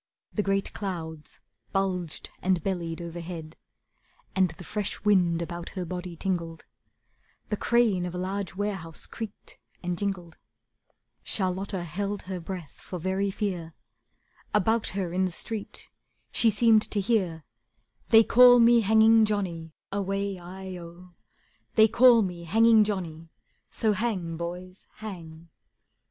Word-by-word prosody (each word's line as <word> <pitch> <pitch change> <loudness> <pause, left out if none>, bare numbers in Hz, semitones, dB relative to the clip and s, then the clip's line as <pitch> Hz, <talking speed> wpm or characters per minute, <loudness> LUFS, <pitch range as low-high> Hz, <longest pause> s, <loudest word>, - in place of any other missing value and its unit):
The 210 - +1
great 195 -1 0
clouds 160 -6 -6 0.3
bulged 185 -4 -2
and 185 -3 +1
bellied 175 -3 -3
overhead, 170 -1 -7 0.8
And 190 -1 +3
the 180 - -10
fresh 205 +2 -3
wind 175 -5 +3
about 170 0 -6
her 180 - -2
body 180 0 -5
tingled; 170 -3 -3 0.8
The 210 - -1
crane 215 -8 +2
of 175 - -6
a - - -3
large 190 0 -3
warehouse 190 -5 -4
creaked 220 -3 -8 0.2
and 175 0 -2
jingled; 180 -5 -4 0.8
Charlotta 190 -1 -2
held 200 +5 -3
her 185 -1 -5
breath 175 -3 -8
for 180 - -6
very 190 +3 -1
fear, 185 -5 -3 0.8
About 220 +2 +2
her 180 -3 -2
in 185 +1 +2
the 185 - -2
street 215 +4 -5 0.4
she 230 - +4
seemed 220 +1 +5
to 210 - 0
hear: 190 -6 0 0.7
"They 225 0 +8
call 245 +2 +8
me 235 0 +6
Hanging 220 +1 +6
Johnny, 180 -6 -2 0.2
Away 195 -1 -2
i 185 +1 -8
oh; 175 +1 -12 0.6
They 220 -1 +7
call 235 0 +6
me 175 -3 -5
Hanging 225 +4 +5
Johnny, 170 -6 -4 0.4
So 220 -2 +1
hang, 190 -6 -2
boys, 180 +3 -7
hang." 170 -6 -9
190 Hz, 130 wpm, -27 LUFS, 170-210 Hz, 0.8 s, They